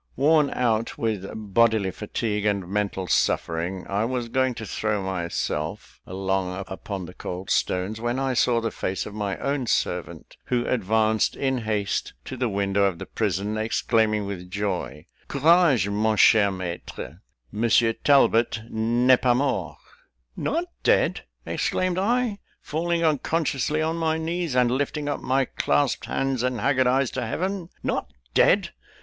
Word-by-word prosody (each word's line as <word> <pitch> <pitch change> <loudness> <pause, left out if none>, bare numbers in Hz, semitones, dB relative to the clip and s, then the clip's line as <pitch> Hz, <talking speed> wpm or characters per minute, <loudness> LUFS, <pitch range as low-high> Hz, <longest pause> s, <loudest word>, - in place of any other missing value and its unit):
Worn 150 +1 +4
out 115 -3 0
with 110 -4 -2
bodily 110 -1 +2
fatigue 105 +2 -3
and 100 -3 0
mental 100 -1 -2
suffering, 85 +2 0
I 100 +2 0
was 120 0 -2
going 130 0 +1
to 110 - -6
throw 105 -1 -1
myself 85 -1 -3
along 95 0 -2
upon 95 -1 -6
the 90 - -10
cold 90 +1 -6
stones, 95 +5 0
when 120 +2 -1
I 135 -1 0
saw 120 -1 +3
the 115 -1 -2
face 95 - -3
of 105 - -8
my 100 -2 -3
own 140 -3 -2
servant, - - -2
who 120 -1 0
advanced 110 -1 +1
in 130 -2 0
haste 105 -3 -2
to 130 - -6
the 125 -1 -1
window 100 0 +1
of 95 -3 0
the - - -7
prison, 105 +3 -2
exclaiming 110 -1 +1
with 90 -2 -6
joy 90 -7 -3 0.2
"Courage, 145 - +4
mon 105 +1 +1
cher 105 -2 +6
maître; 90 -4 -6 0.3
Monsieur 115 +1 +3
Talbot 120 -5 +3
n'est 120 +3 +3
pas 125 -1 +3
mort." 130 - -1 0.6
"Not 335 +3 -1 0.2
dead!" - - +2 0.2
exclaimed 185 0 0
I 230 +1 +1 0.2
(falling 170 +2 -1
unconsciously 155 -1 0
on 160 +1 -1
my 160 -1 0
knees, 165 -2 -2
and 125 -1 +3
lifting 145 +3 -1
up 145 - -1
my 135 +1 +1
clasped 75 -10 0
hands 135 -2 -1
and 125 -1 -1
haggard 130 -2 +2
eyes 130 0 +2
to - - -3
Heaven): 185 - -3
"not 65 - -2 0.2
dead! - - +4
115 Hz, 150 wpm, -25 LUFS, 100-135 Hz, 0.6 s, cher